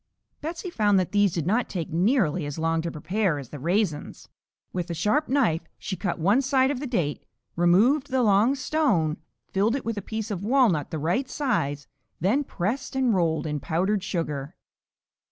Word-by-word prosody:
Betsey 335 +4 -5
found 205 - +3
that 185 - -2
these 205 -2 +3
did 165 -3 -2
not 225 +7 +1
take 170 -4 -4
nearly 180 - +2
as 145 - -6
long 165 0 0
to 170 - -3
prepare 175 +2 -1
as 135 -4 -8
the 145 - -8
raisins. 170 0 -1 0.4
With 180 -1 -3
a 170 - -3
sharp 210 - +1
knife 235 - +2 0.2
she 190 - -4
cut 185 +2 -2
one 200 +10 +3
side 265 0 +2
of 275 - -3
the 285 - -4
date, 170 - -1 0.3
removed 215 - +3
the 260 -1 +1
long 215 +5 +4
stone, 260 - +1 0.3
filled 210 +5 +2
it 275 - -4
with 225 -2 -2
a - - -7
piece 220 +2 -5
of 195 -2 -4
walnut 220 - +3
the 160 - -4
right 205 - -1
size, 145 - -1 0.3
then 215 - +2
pressed 240 +4 -3
and 260 -3 +2
rolled 165 -4 +1
in 150 -1 -2
powdered 190 +7 0
sugar. 155 -5 -3
195 Hz, 185 wpm, -25 LUFS, 165-250 Hz, 0.4 s, long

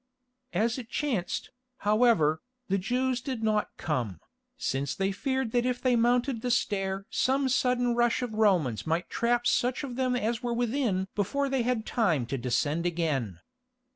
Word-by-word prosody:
As 230 +6 +1
it 235 -3 -9
chanced, 240 -12 -2 0.3
however, 210 -8 +3 0.3
the 195 +1 +2
Jews 250 +5 0
did 250 -3 -4
not 215 -1 +1
come, 120 - -2 0.4
since 140 +1 -2
they 195 0 0
feared 260 +3 -1
that 240 0 +2
if 250 -1 -1
they 255 -2 +2
mounted 240 +1 +2
the 250 - -2
stair 195 -5 0
some 270 +1 +2
sudden 250 -1 +2
rush 240 +1 +2
of 240 -3 -4
Romans 180 - +2
might 170 +2 -1
trap 240 +1 +1
such 245 +3 +1
of 250 -3 -5
them 255 -1 +1
as 235 0 -1
were 240 -1 -1
within 235 -6 0
before 275 +8 0
they 265 -1 +1
had 235 -2 0
time 165 - +1
to 135 +3 -3
descend 145 +7 0
again. 145 - -2
230 Hz, 165 wpm, -28 LUFS, 180-250 Hz, 0.4 s, however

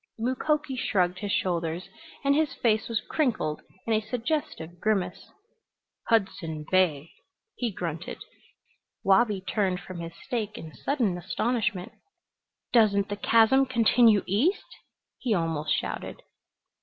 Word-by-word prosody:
Mukoki 265 +4 0
shrugged 180 -7 0
his 205 0 -3
shoulders 170 -1 -1 0.4
and 280 0 +4
his 310 0 +1
face 220 -1 +1
was 230 -2 0
crinkled 230 - 0 0.2
in 230 - +1
a 215 - +2
suggestive 225 - -3
grimace. 190 -4 -1 0.8
"Hudson 170 -8 0
Bay," 165 -5 +2 0.4
he 240 -3 -2
grunted. 170 -3 -5 0.9
Wabi 195 0 +3
turned 190 -2 0
from 185 -2 -8
his 165 0 -6
steak 220 -5 -3
in 160 -1 -9
sudden 230 -11 -1
astonishment. 215 +1 -1 0.8
"Doesn't 200 -4 +4
the 205 - -2
chasm 230 +6 +4
continue 230 -3 +4
east?" 255 - 0 0.4
he 240 -5 +1
almost 160 -3 -1
shouted. - - -3
205 Hz, 120 wpm, -27 LUFS, 180-240 Hz, 0.9 s, and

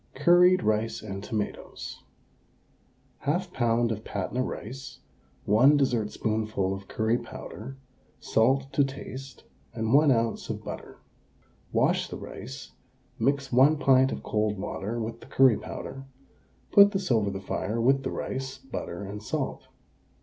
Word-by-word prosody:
CURRIED 175 +5 +5
RICE 110 +1 0
AND 100 -2 -6
TOMATOES. 105 -2 -5 1.3
1/2 175 +5 0
lb. 120 -3 +1
of 110 0 -4
Patna 100 +6 -2
rice, 125 +1 -6 0.5
1 130 +8 +6
dessertspoonful 110 -5 0
of 95 0 -8
curry 110 +2 0
powder, 120 +2 -9 0.4
salt 135 +4 +2
to 140 - +4
taste, 135 -1 -7 0.3
and 110 0 -1
1 150 +1 +6
oz. 115 -2 0
of - - -4
butter. - - -8 0.7
Wash - - +2
the - - -6
rice; 65 0 -9 0.5
mix 140 0 +1
1 135 +5 +5
pint 130 -2 +4
of - - -5
cold 105 -1 0
water 105 +4 -4
with 115 +1 -4
the - - -14
curry 130 -5 +5
powder, 135 0 -7 0.7
put 200 +1 +7
this 190 -6 -1
over 110 -4 +3
the 95 -1 -4
fire 105 +3 -3
with 135 +4 +3
the - - -3
rice, 130 0 -4
butter, 105 -8 -6
and 100 +1 -6
salt. 105 - -3
120 Hz, 135 wpm, -27 LUFS, 110-135 Hz, 1.3 s, put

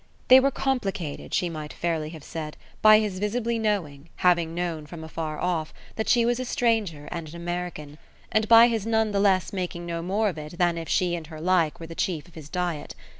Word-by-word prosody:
They 260 +1 +10
were 275 +1 +3
complicated, 200 - -2
she 180 - +1
might 155 -3 -6
fairly 160 -3 -2
have 160 -2 -10
said, 155 -1 -6 0.2
by 215 0 +8
his 210 -4 -1
visibly 230 +3 -1
knowing, 170 -9 -2
having 170 -2 +2
known 170 -4 -3
from 160 0 -9
afar 160 -1 -5
off, 170 -3 -2 0.2
that 220 - -2
she 240 -2 +4
was 240 +1 +1
a - - -1
stranger 215 -12 0
and 170 -3 -5
an 165 - -11
American, 170 -4 -5 0.3
and 220 0 +2
by 230 +1 +9
his 225 -3 -2
none 220 -1 +2
the 200 - +1
less 195 -1 +2
making 175 -2 -4
no 170 -1 -3
more 205 +5 +1
of 165 -5 -6
it 150 +3 -9
than 175 -1 +2
if 165 - -7
she 180 -3 +2
and 165 -3 -4
her 155 -1 -9
like 170 -2 +1
were 165 - -7
the 165 - -8
chief 165 -2 -2
of 175 - -20
his 155 -3 -11
diet. 175 -4 -3
175 Hz, 220 wpm, -26 LUFS, 160-210 Hz, 0.3 s, They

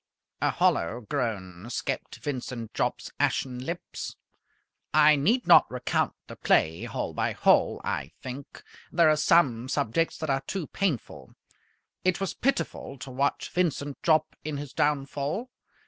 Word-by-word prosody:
A - - +3
hollow 100 +9 +1
groan 105 -8 -3
escaped 120 - -3
Vincent 125 -5 -5
Jopp's - - -2
ashen 125 -2 0
lips. 170 +5 -5 0.8
I 155 0 +7
need 215 - +2
not 175 - +7
recount 125 -1 -1
the - - -10
play 80 +1 +2
hole - - -3
by - - 0
hole, - - +3
I - - -3
think. 130 +2 -8 0.3
There 165 -2 +5
are - - +4
some 135 -7 +3
subjects 145 +5 0
that 155 - -4
are 135 0 +1
too 190 -5 -2
painful. 170 - -3 0.7
It 185 0 +2
was 195 -1 -2
pitiful 255 - -1
to 130 +2 -8
watch 140 +3 -1
Vincent 145 -5 -1
Jopp 155 -2 +2
in 150 -1 -3
his 145 -1 -7
downfall. 145 - -1
140 Hz, 140 wpm, -27 LUFS, 125-165 Hz, 0.8 s, I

